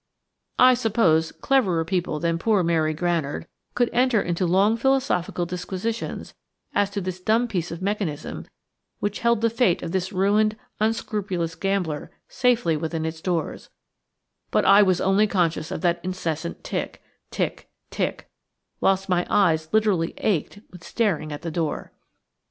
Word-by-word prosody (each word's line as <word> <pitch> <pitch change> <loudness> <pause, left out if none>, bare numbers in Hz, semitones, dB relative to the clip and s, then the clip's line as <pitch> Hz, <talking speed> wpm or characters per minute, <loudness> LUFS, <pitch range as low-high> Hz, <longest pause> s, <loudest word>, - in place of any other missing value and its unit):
I 255 0 +7
suppose 200 -10 +2
cleverer 190 -12 +1
people 175 -4 -1
than 165 0 0
poor 210 -1 +2
Mary 160 -2 +2
Granard 165 -3 -1 0.3
could 245 - +3
enter 250 -2 +3
into 175 -1 -1
long 195 +5 +3
philosophical 235 -9 0
disquisitions 185 +5 -4 0.4
as 205 -1 +2
to 200 0 -4
this 185 0 -4
dumb 225 +5 +2
piece 180 -7 -2
of 170 +2 -7
mechanism 195 -7 -3 0.5
which 205 0 -2
held 235 -1 +2
the 230 - +3
fate 230 -7 +2
of 170 - -4
this 190 +1 -1
ruined, 210 +3 +2 0.2
unscrupulous 210 -6 -1
gambler 175 -4 -2 0.2
safely 245 -9 +2
within 160 +1 -3
its 160 0 -5
doors; 170 -4 -3 0.8
but - - +2
I 200 +2 +7
was 185 -3 +3
only 195 +3 +3
conscious 170 -5 0
of - - -4
that 175 -1 +1
incessant 170 -3 -4
tick, - - -4 0.3
tick, - - -3 0.2
tick, - - -2 0.5
whilst 195 0 +2
my 180 -2 +1
eyes 160 -6 +2
literally 210 -6 +1
ached 205 +1 -1
with 180 -1 -13
staring 185 -11 -1
at 145 +2 -7
the 165 - -3
door. 160 -2 -3
185 Hz, 145 wpm, -24 LUFS, 165-215 Hz, 0.8 s, I